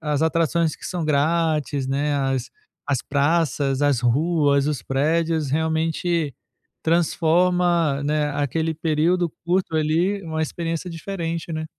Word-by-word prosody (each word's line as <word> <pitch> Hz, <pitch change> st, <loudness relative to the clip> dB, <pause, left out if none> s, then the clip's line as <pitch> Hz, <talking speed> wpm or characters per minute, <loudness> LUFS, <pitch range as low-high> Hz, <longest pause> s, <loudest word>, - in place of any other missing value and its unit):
as 150 Hz, -2 st, -1 dB
atrações 165 Hz, 0 st, +1 dB
que -, -, -14 dB
são 175 Hz, -3 st, -3 dB
grátis, 155 Hz, -2 st, +1 dB
né, 145 Hz, +2 st, 0 dB
as 135 Hz, -2 st, -1 dB, 0.4 s
as 140 Hz, -3 st, +1 dB
praças, 145 Hz, -2 st, +1 dB
as 145 Hz, -4 st, +2 dB
ruas, 140 Hz, +2 st, +2 dB
os 145 Hz, -7 st, -2 dB
prédios, 155 Hz, +3 st, 0 dB
realmente 160 Hz, 0 st, 0 dB, 0.5 s
transforma, 170 Hz, -2 st, +2 dB
né, 150 Hz, 0 st, 0 dB
aquele 155 Hz, +3 st, -1 dB
período 165 Hz, +2 st, +1 dB
curto 175 Hz, -1 st, 0 dB
ali 170 Hz, +6 st, +1 dB
numa 160 Hz, -1 st, -3 dB
experiência 165 Hz, +2 st, -3 dB
diferente, 165 Hz, -1 st, -4 dB
né. 155 Hz, 0 st, -3 dB
160 Hz, 120 wpm, -22 LUFS, 145-170 Hz, 0.5 s, as